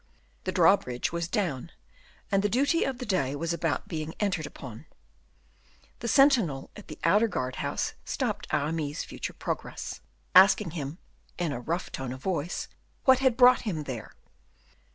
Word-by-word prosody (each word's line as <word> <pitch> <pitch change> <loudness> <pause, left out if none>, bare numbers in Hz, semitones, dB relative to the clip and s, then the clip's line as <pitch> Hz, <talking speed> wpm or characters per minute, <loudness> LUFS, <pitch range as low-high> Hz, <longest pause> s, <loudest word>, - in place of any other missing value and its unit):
The 185 - 0
drawbridge 165 -9 +3
was 170 0 -2
down, 170 - -2 0.6
and 195 -1 +3
the 205 - +1
duty 280 - +2
of 265 -2 -2
the 250 - -5
day 160 - 0
was 165 +3 -2
about 165 -5 -1
being 155 -1 -4
entered 180 -7 0
upon. 120 -7 -10 1.1
The 235 - -4
sentinel 235 - +3
at 210 - -11
the - - -8
outer 215 +3 +4
guardhouse 130 -10 -2
stopped - - -2
Aramis's 150 +1 -1
further - - -6
progress, - - -5 0.3
asking 190 -1 +7
him, 150 -1 -5 0.4
in 175 -4 -1
a 120 - -3
rough 170 +8 -3
tone 130 -2 -4
of 130 - -11
voice, 175 -3 -2 0.4
what 260 -1 +6
had 260 -3 +2
brought 250 0 +7
him 175 -9 -3
there. 125 -6 -7
170 Hz, 155 wpm, -28 LUFS, 145-210 Hz, 1.1 s, asking